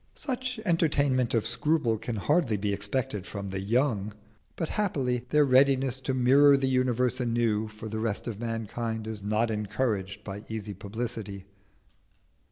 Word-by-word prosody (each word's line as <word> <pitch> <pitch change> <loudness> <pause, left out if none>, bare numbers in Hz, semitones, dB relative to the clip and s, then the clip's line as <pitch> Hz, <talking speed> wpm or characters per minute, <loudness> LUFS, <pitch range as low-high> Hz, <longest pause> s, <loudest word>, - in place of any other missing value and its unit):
Such 255 -2 -3
entertainment 140 - +2
of 115 - +1
scruple 120 -2 +1
can 120 - -4
hardly 130 - +1
be 100 0 -1
expected 100 -1 -3
from 100 -1 -5
the 95 0 -3
young; 105 -1 0 0.4
but 165 - -3
happily 130 - -1
their 150 -1 +4
readiness 130 -1 +4
to 130 0 -2
mirror 140 +3 +6
the 135 -1 0
universe 125 -1 +1
anew 115 -3 +1
for 110 +1 -9
the 110 0 -4
rest 110 -3 -2
of 110 -4 -5
mankind 115 -1 -3
is 110 -2 -5
not 110 +3 +1
encouraged 105 -2 -2
by 100 0 -6
easy 110 -2 -4
publicity. 105 -1 -5
115 Hz, 150 wpm, -28 LUFS, 105-130 Hz, 0.4 s, mirror